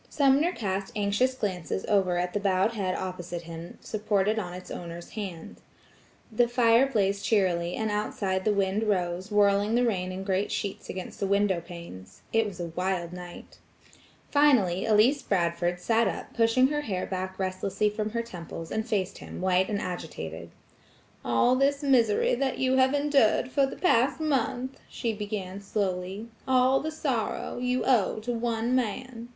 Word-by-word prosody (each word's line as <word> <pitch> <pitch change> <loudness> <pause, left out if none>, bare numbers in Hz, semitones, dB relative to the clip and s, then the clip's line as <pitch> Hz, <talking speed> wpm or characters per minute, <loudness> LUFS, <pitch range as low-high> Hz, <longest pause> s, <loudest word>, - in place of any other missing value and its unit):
Sumner 285 +4 +3
cast 195 - -3
anxious 210 +5 +1
glances 190 -5 -3
over 190 -4 +2
at 180 0 -1
the 205 - 0
bowed 195 +1 +2
head 190 -4 -1
opposite 175 -2 -5
him 165 +1 -9
supported 210 0 0
on 180 -4 -4
its 180 +1 -9
owner's 170 0 -7
hand. 190 -7 -6 0.7
The 235 +2 +3
fire 240 +1 +4
blazed 200 -5 0
cheerily, 180 -5 +1
and 220 -1 -1
outside 200 -2 -1
the 215 - +2
wind 200 +2 +1
rose, 185 -2 -1
whirling 205 +1 +3
the 245 +1 +3
rain 185 -5 -1
in 185 +1 -5
great 195 +1 0
sheets 200 -2 -4
against 185 -1 -6
the 200 - 0
window 200 -3 +2
panes. 170 - -11
It 225 -1 +3
was 190 -3 -8
a 170 -1 -3
wild 180 -2 -1
night. 180 -1 -10 0.7
Finally 230 -11 +3
Elsie 225 +7 +4
Bradford 175 -1 +1
sat 230 +5 +2
up - - -5
pushing 235 +3 +4
her 295 0 -1
hair 190 -10 -2
back 185 0 -4
restlessly 190 +2 -1
from 215 0 -2
her 235 +1 -2
temples, 165 -6 -8
and 220 +1 -2
faced 195 -4 -1
him - - -8
white 185 0 +2
and 205 -2 -1
agitated. 85 - -6 0.7
"All 120 - +3
this 280 +2 +1
misery 240 -7 +3
that 265 +1 0
you 260 0 +2
have 260 +2 +4
endured 280 -4 +3
for 275 0 +3
the - - -7
past 265 -5 +2
month," 265 -3 -1
she 230 -3 -2
began 200 -2 -5
slowly,–"all 215 +7 0
the 315 - -3
sorrow, 265 -8 -2
you 250 +1 0
owe 240 -8 +3
to 245 +3 -3
one 235 0 -1
man. 245 0 -2
205 Hz, 165 wpm, -27 LUFS, 185-240 Hz, 0.7 s, fire